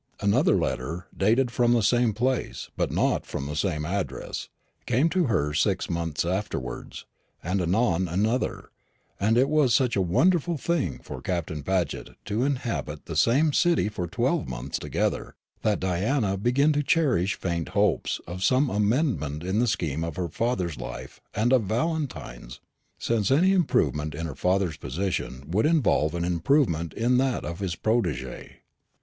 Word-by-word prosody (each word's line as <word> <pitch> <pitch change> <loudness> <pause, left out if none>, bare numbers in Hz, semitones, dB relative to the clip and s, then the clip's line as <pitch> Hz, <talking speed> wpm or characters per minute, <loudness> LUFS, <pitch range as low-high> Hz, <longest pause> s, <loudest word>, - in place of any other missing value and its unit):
Another 100 0 +3
letter, 80 +8 -2
dated 120 +5 +2
from 120 0 +3
the 115 -2 +2
same 120 +2 +3
place, 125 +4 -2
but - - 0
not - - +1
from 70 - -5
the 75 +1 -4
same 75 -1 -1
address, 95 +3 -4 0.4
came 140 +8 +3
to 180 0 +1
her 75 - 0
six 95 +3 0
months 85 -2 -1
afterwards, 85 -9 -4 0.4
and 95 +3 0
anon 95 0 +1
another; 105 +9 -1 0.5
and 110 +3 +2
it 130 +2 +4
was 145 -5 +3
such 125 -2 +2
a 100 - +2
wonderful 165 - +2
thing 170 +1 -1
for - - -8
Captain 80 -4 -3
Paget 90 -1 -2
to 110 +4 -1
inhabit 120 - -2
the 85 - -6
same 135 - +3
city 170 -10 +3
for 90 -4 -4
twelve 130 - 0
months 60 +2 -4
together, - - -2 0.3
that 105 -2 +1
Diana 100 +4 0
began 125 +9 +2
to 145 - +1
cherish 130 - +2
faint 85 -2 -2
hopes - - +1
of 90 +2 -5
some 130 +5 +3
amendment 105 - 0
in 95 +4 0
the 120 - +2
scheme 80 -7 -1
of 85 - -4
her 90 -2 -2
father's 90 - -1
life 65 - -8
and 115 +5 +2
of 125 -5 +4
Valentine's, 115 - -3 0.4
since 110 -4 0
any 170 +8 +4
improvement 75 - +1
in 80 +3 -4
her 80 - -4
father's 90 -1 0
position 70 -3 -3
would 110 +9 +3
involve 120 - +2
an 85 0 -1
improvement 85 - +1
in 120 +2 +2
that 130 -2 0
of 85 +1 -5
his 95 -4 -2
protégé. 110 - -2
100 Hz, 160 wpm, -26 LUFS, 85-125 Hz, 0.5 s, it